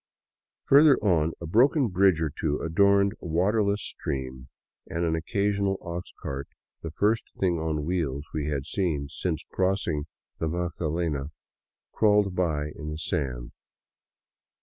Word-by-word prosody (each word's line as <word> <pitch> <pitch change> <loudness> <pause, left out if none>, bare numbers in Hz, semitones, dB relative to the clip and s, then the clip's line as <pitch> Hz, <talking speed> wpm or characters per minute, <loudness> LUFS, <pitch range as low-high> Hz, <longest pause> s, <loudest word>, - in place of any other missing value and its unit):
Further 145 0 +7
on, 85 -6 +2
a 85 - -6
broken 125 - +3
bridge 90 -3 +3
or 75 - -1
two 75 0 -1
adorned 100 +4 +3
a - - -6
waterless 100 +5 +1
stream, 65 -1 -5 0.4
and 85 +1 -2
an 80 - +1
occasional 100 +3 0
ox 85 +1 -6
cart, 70 0 -4 0.3
the 80 - -5
first 105 +7 0
thing 90 -3 +1
on 80 -2 -2
wheels 75 -6 -1
we 75 -2 -2
had 70 -3 -2
seen 80 -8 -1
since 80 +1 -3
crossing 90 -6 0 0.3
the 80 - 0
Magdalena, 80 -3 -2 0.7
crawled 105 -3 +3
by 75 -5 -1
in 75 -1 -6
the 75 - -4
sand. 65 -7 -3
85 Hz, 135 wpm, -27 LUFS, 75-100 Hz, 0.7 s, Further